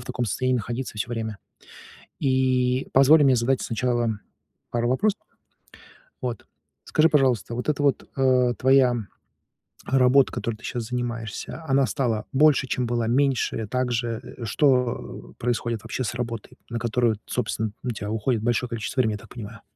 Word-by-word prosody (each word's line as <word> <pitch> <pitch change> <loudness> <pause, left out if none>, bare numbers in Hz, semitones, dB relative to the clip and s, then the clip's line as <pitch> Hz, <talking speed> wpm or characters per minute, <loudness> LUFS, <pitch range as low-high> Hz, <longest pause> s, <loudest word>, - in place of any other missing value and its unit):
в 125 - -10
таком 125 -1 -2
состоянии 130 +4 0
находиться 120 +1 -4
всё 110 - -2
время. 110 -3 -4 0.8
И 130 -1 +1
позволь 145 +4 +7
мне 130 -2 +5
задать 125 +3 +1
сначала 120 0 0 0.6
пару 120 0 0
вопросов. 200 - +1 1.0
Вот. - - -4 0.4
Скажи, 155 +1 +3
пожалуйста, 130 -7 +2
вот 125 - -4
эта 145 -1 +1
вот, 140 -2 +1
а, 130 -2 +3
твоя 130 -2 +4 0.9
работа, 130 +1 +4
которой 115 -2 -3
ты 115 - -20
щас 120 -2 -3
занимаешься, 120 +4 -4
она 135 0 +3
стала 115 -3 -1
больше, 140 -1 +4
чем 125 -1 -1
была, 120 -1 -1
меньше, 130 -3 +1
так 125 +2 -1
же? 120 +1 -3
Что 125 - 0
происходит, 115 -2 -1
вообще, 130 - -3
с 115 - -3
работой, 115 -2 -5
на 115 - -2
которую, 120 -1 +1
т 105 - -26
собственно, 110 -3 -2
у 125 - -1
тебя 105 -2 -5
уходит 110 +1 0
большое 120 +1 0
количество 115 +3 -2
времени, 110 -4 +2
я - - -5
так - - -15
понимаю? 115 -1 -9
125 Hz, 160 wpm, -24 LUFS, 115-130 Hz, 1.0 s, позволь